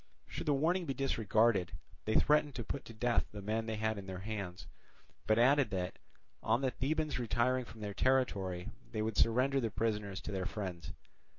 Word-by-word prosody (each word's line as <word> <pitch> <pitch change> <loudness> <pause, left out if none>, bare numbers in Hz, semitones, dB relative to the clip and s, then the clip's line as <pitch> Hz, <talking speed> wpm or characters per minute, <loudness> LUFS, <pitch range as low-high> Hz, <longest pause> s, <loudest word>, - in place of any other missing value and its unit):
Should - - -6
the 145 - +4
warning 170 +5 +1
be 135 - -2
disregarded, 110 -7 +2 0.3
they 110 - 0
threatened 150 -2 +4
to 120 - -3
put 140 - -5
to 115 - -10
death 120 +1 +1
the 105 - -7
men 110 +3 -2
they 110 - -1
had 110 -1 -1
in 95 - -9
their 95 -1 -5
hands, 100 -5 -4 0.6
but 110 - +4
added 135 +1 +5
that, 90 -3 -3 0.4
on 115 +3 +2
the 130 -2 +1
Thebans 155 +2 -1
retiring 125 +2 +1
from 115 -1 -12
their 105 -1 -4
territory, 100 -9 +1 0.2
they 110 -1 0
would 110 -1 -2
surrender 130 +4 +3
the 115 -3 0
prisoners 105 -3 -1
to - - -6
their 95 -2 -2
friends. 90 -7 -5
110 Hz, 190 wpm, -34 LUFS, 100-130 Hz, 0.6 s, added